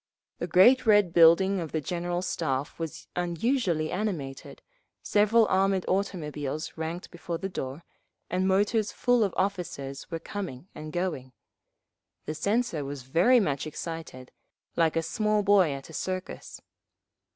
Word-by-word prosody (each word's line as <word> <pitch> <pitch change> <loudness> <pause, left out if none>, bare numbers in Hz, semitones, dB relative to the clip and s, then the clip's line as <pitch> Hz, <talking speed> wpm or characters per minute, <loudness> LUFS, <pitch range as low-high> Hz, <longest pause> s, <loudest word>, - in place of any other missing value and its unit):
The 170 - -2
great 210 +9 +5
red 205 -5 +5
building 175 +4 +6
of 165 -3 -5
the 160 - +1
General 175 +2 -3
Staff 145 -5 -2
was 165 -2 -5
unusually 175 - 0
animated, 175 -10 -4 0.4
several 215 +2 +4
armoured 190 0 +2
automobiles 155 -6 -2
ranked 165 +2 -5
before 170 -1 -5
the 195 - -4
door, 145 -4 -6 0.4
and 185 +1 0
motors 205 +3 +2
full 245 -2 +2
of 200 - 0
officers 175 -8 -3
were 165 - -3
coming 180 -6 -6
and 155 0 -8
going…. 155 -8 -3 0.9
The 155 - -3
censor 200 -2 0
was 140 -1 -6
very 175 - +4
much 145 -7 -1
excited, 155 -5 -7 0.4
like 165 -1 +2
a 165 - +1
small 210 +4 0
boy 195 -4 +5
at 135 -1 -6
a - - -13
circus. 185 +3 -5
175 Hz, 140 wpm, -27 LUFS, 155-200 Hz, 0.9 s, building